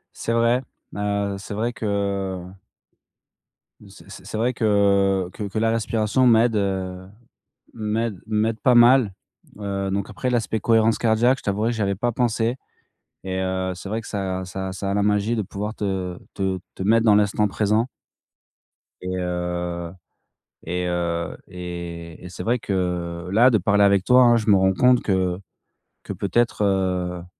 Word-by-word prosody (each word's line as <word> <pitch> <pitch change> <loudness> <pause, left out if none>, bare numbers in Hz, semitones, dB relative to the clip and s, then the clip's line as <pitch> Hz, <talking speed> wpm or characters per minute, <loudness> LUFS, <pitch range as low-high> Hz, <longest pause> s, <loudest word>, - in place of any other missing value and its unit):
C'est - - -3
vrai, 115 +2 +2 0.3
heu, 100 -1 -1
c'est 100 0 -7
vrai 115 +3 -1
que, 115 - -6
heu 100 -2 -2 1.4
c'est - - -16
c'est - - -11
c'est - - -5
vrai 120 +3 +1
que 100 -4 +2
que - - -6
que 100 +1 -3
la 115 +1 +2
respiration 115 +2 +1
m'aide, 115 0 +4
heu, 95 -2 -2 0.7
m'aide 110 -2 -2
m'aide 110 +1 0
pas 125 +4 +3
mal, 120 -3 +6 0.5
heu, 100 -1 -3
donc 100 +1 -2
après 115 +5 -3
l'aspect 115 -2 0
cohérence 115 -1 +3
cardiaque, 120 +4 +2
je - - -18
t'avouerai 105 +3 0
que - - -3
j'y 110 - -3
avais 100 -1 0
pas 120 +5 -1
pensé 120 0 0 0.7
et 95 -1 -3
heu, 95 0 -1
c'est 90 +2 -9
vrai 110 +3 -2
que 115 - -11
ça 95 -2 -3
ça 95 +1 -5
ça 95 +1 -4
a - - 0
la 100 - +1
magie 105 +3 +1
de 110 - 0
pouvoir 105 +3 -5
te, 105 - -5
heu, 95 -2 -3 0.2
te 95 -1 -1 0.2
te - - -6
mettre 115 +3 +3
dans 105 -2 +6
l'instant 105 0 +2
présent 105 +4 +1 1.1
et 95 0 -4
heu 90 -1 -3 0.7
et 90 +2 -2
heu 85 -1 -2
et 85 -2 -7
et - - -7
c'est 85 - -7
vrai 120 +2 +1
que 90 -4 -3
là, 115 +6 +6
de 115 - +3
parler 100 +1 +2
avec 100 -2 +4
toi, 125 +1 +6
hein, 120 -1 +5
je 110 -1 -1
me 100 - +6
rends 95 0 +3
compte 125 +5 +4
que 95 -2 0 0.6
que - - -5
peut-être, 110 +2 0
heu 90 -3 0
100 Hz, 175 wpm, -23 LUFS, 95-110 Hz, 1.4 s, mal